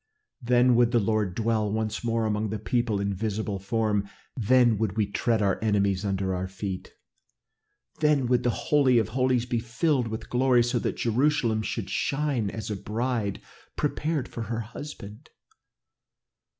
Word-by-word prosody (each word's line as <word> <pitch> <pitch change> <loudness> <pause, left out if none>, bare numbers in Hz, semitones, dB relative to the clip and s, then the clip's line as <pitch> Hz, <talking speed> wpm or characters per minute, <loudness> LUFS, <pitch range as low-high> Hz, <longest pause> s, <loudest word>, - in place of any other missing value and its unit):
Then 125 0 +4
would 120 -1 +5
the 120 - +4
Lord 105 -3 0
dwell 110 -2 0
once 110 +1 -2
more 115 -1 0
among 105 0 -1
his 105 0 -4
people 120 -4 0
in 100 0 -1
visible 105 0 -2
form. 105 0 0 0.3
Then 120 -2 +3
would 110 -2 -1
we 110 - +3
tread 110 +2 0
our 100 +1 0
enemies 100 -2 +1
under 95 -1 -1
our 90 +1 -2
feet, 95 0 -6 1.1
then 150 -4 +3
would 125 0 +2
the 120 - +1
Holy 130 0 +3
of 110 -4 +1
Holies 130 -2 +1
be 120 -2 -1
filled 125 +3 0
with 110 0 -5
glory 125 -1 +3
so 120 +1 0
that - - -2
Jerusalem 120 -2 +1
should 105 -2 -4
shine 140 -7 0
as 110 0 -5
a - - -1
bride 110 +1 -2 0.3
prepared 150 -1 -1
for 115 - -7
her 115 +1 -3
husband. 115 0 -9
115 Hz, 160 wpm, -26 LUFS, 105-125 Hz, 1.1 s, would